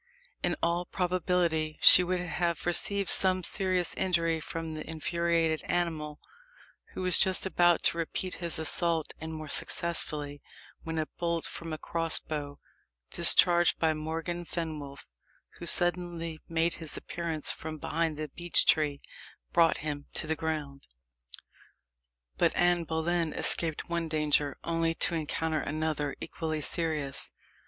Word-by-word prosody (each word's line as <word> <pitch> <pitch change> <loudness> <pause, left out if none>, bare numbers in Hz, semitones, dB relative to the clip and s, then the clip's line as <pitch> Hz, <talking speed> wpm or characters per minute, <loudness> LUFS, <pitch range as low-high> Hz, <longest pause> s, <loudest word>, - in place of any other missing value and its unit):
In - - 0
all 170 +1 0
probability 175 -4 -1
she 180 - +8
would 180 0 -1
have 175 -1 -2
received 200 +3 +2
some 185 -1 +2
serious 185 -2 0
injury 165 -3 0
from 165 0 -6
the 155 0 -7
infuriated 165 0 0
animal, 160 -4 -2 0.8
who 185 - -4
was 185 -1 +3
just 190 -1 +3
about 175 -2 +2
to 170 - +2
repeat 180 +3 -2
his 170 -1 +1
assault 160 0 +1
and 160 +1 -6
more 155 -1 -7
successfully, 150 -2 0 0.4
when 160 0 -5
a 155 - 0
bolt 170 -1 -1
from 165 -1 -7
a 155 - -4
cross 165 +1 +1
bow, 145 -2 -6 0.5
discharged 175 -1 +5
by 160 -1 +1
Morgan 165 +3 -4
Fenwolf, 155 -5 -6 0.5
who 170 - -7
suddenly 175 -2 +3
made 165 +1 +1
his 160 - -6
appearance 165 -3 0
from 155 0 -6
behind 160 +1 -2
the 155 0 -4
beech 175 +4 +1
tree, 150 -3 +2 0.5
brought 165 -2 +4
him 145 -1 -4
to - - 0
the 160 +1 -1
ground. 150 -3 -5 1.5
But - - +2
Anne 175 -1 +2
Boleyn 160 0 -1
escaped 160 -3 +2
one 170 -1 -2
danger 150 -2 0
only 165 0 -1
to 170 - +2
encounter 160 0 -2
another 155 -1 -3
equally 155 -2 -4
serious. 150 -3 -2
165 Hz, 135 wpm, -29 LUFS, 155-175 Hz, 1.5 s, she